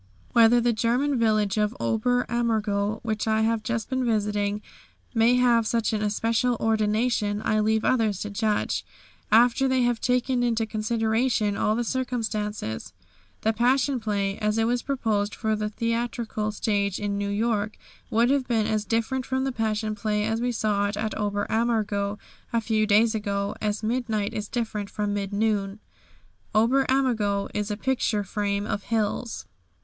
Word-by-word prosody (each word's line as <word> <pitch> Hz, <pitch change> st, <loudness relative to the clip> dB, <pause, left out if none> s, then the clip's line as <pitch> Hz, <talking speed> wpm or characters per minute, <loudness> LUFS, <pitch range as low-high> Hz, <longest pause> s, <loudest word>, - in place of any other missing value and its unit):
Whether 235 Hz, +1 st, +6 dB
the 240 Hz, 0 st, +2 dB
German 245 Hz, +5 st, +1 dB
village 215 Hz, -2 st, +2 dB
of 210 Hz, +4 st, 0 dB
Ober 245 Hz, +3 st, +1 dB
Ammergau 220 Hz, -3 st, 0 dB
which 220 Hz, -1 st, -2 dB
I 220 Hz, 0 st, +2 dB
have 225 Hz, 0 st, +1 dB
just 225 Hz, +1 st, -2 dB
been 260 Hz, -1 st, -1 dB
visiting, 210 Hz, -2 st, 0 dB, 0.5 s
may 230 Hz, +1 st, +4 dB
have 240 Hz, -3 st, +3 dB
such 230 Hz, -1 st, 0 dB
an 215 Hz, -, 0 dB
especial 225 Hz, +3 st, +1 dB
ordination, 215 Hz, -1 st, +1 dB
I 215 Hz, -, +2 dB
leave 220 Hz, +1 st, +1 dB
others 220 Hz, -6 st, +2 dB
to 210 Hz, -, -4 dB
judge 215 Hz, 0 st, 0 dB, 0.5 s
after 245 Hz, +4 st, +5 dB
they 260 Hz, -1 st, +2 dB
have 240 Hz, -1 st, 0 dB
taken 250 Hz, 0 st, +1 dB
into 230 Hz, -2 st, +1 dB
consideration 220 Hz, 0 st, 0 dB
all 215 Hz, -, +1 dB
the 240 Hz, -, 0 dB
circumstances. 215 Hz, -, -3 dB, 0.5 s
The 220 Hz, -, +1 dB
Passion 255 Hz, +3 st, +2 dB
Play, 200 Hz, -2 st, -1 dB
as 210 Hz, 0 st, 0 dB
it 225 Hz, -, +3 dB
was 240 Hz, +2 st, +1 dB
proposed 220 Hz, -7 st, -1 dB
for 220 Hz, -2 st, 0 dB
the 210 Hz, 0 st, -2 dB
theatrical 230 Hz, -1 st, -2 dB
stage 200 Hz, -2 st, 0 dB
in 205 Hz, -1 st, -2 dB
New 200 Hz, 0 st, -2 dB
York, 210 Hz, 0 st, -1 dB, 0.3 s
would 235 Hz, +3 st, +3 dB
have 275 Hz, -2 st, +1 dB
been 225 Hz, -3 st, +1 dB
as 215 Hz, -1 st, -1 dB
different 230 Hz, +4 st, -1 dB
from 260 Hz, +1 st, -1 dB
the 270 Hz, -, -1 dB
Passion 220 Hz, -2 st, -1 dB
Play 210 Hz, 0 st, -1 dB
as 225 Hz, +1 st, -1 dB
we 245 Hz, 0 st, 0 dB
saw 210 Hz, -3 st, 0 dB
it 205 Hz, 0 st, -4 dB
at 215 Hz, 0 st, -2 dB
Ober 205 Hz, -1 st, -1 dB
Ammergau 215 Hz, -3 st, 0 dB, 0.3 s
a 230 Hz, -, +2 dB
few 220 Hz, -1 st, 0 dB
days 220 Hz, +2 st, +4 dB
ago 200 Hz, -2 st, -2 dB
as 210 Hz, 0 st, -1 dB
midnight 220 Hz, -3 st, -1 dB
is 210 Hz, -1 st, -4 dB
different 220 Hz, -4 st, -3 dB
from 205 Hz, 0 st, -2 dB
mid 200 Hz, -1 st, -3 dB
noon. 205 Hz, -1 st, 0 dB, 0.8 s
Ober 250 Hz, +5 st, +4 dB
Ammergau 225 Hz, -7 st, +1 dB
is 210 Hz, 0 st, -2 dB
a 210 Hz, -, -2 dB
picture 235 Hz, -4 st, 0 dB
frame 200 Hz, 0 st, -2 dB
of 205 Hz, -1 st, -3 dB
hills. 225 Hz, +1 st, -2 dB
220 Hz, 165 wpm, -25 LUFS, 210-235 Hz, 0.8 s, Whether